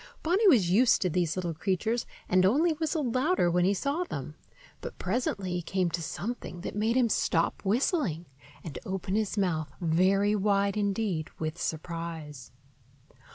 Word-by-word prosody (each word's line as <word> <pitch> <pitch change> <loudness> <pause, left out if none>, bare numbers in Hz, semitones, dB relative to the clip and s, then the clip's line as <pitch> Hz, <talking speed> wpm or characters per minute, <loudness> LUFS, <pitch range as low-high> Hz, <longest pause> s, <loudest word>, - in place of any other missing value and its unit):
Bonny 380 +7 +3
was 215 - +5
used 235 +5 +5
to 180 - 0
these 170 -2 0
little 175 -3 -2
creatures, 195 +8 -1 0.2
and 185 0 +3
only 290 - +4
whistled 310 -5 -1
louder 255 - +2
when 180 +1 +2
he 195 - +3
saw 280 - -1
them; 355 - -6 0.5
but - - -7
presently 195 -2 -2
he 175 0 -1
came 180 0 -1
to 170 - -2
something 200 +1 -5
that - - -5
made 220 +3 +1
him 250 -2 +4
stop 170 -6 0
whistling 210 - 0 0.4
and 160 -5 -6
open 190 0 -4
his 215 0 0
mouth 160 -6 0
very 190 +5 +2
wide 200 0 +1
indeed 200 -5 -1
with 155 +1 -4
surprise. 160 -5 -5
190 Hz, 155 wpm, -29 LUFS, 170-230 Hz, 0.5 s, was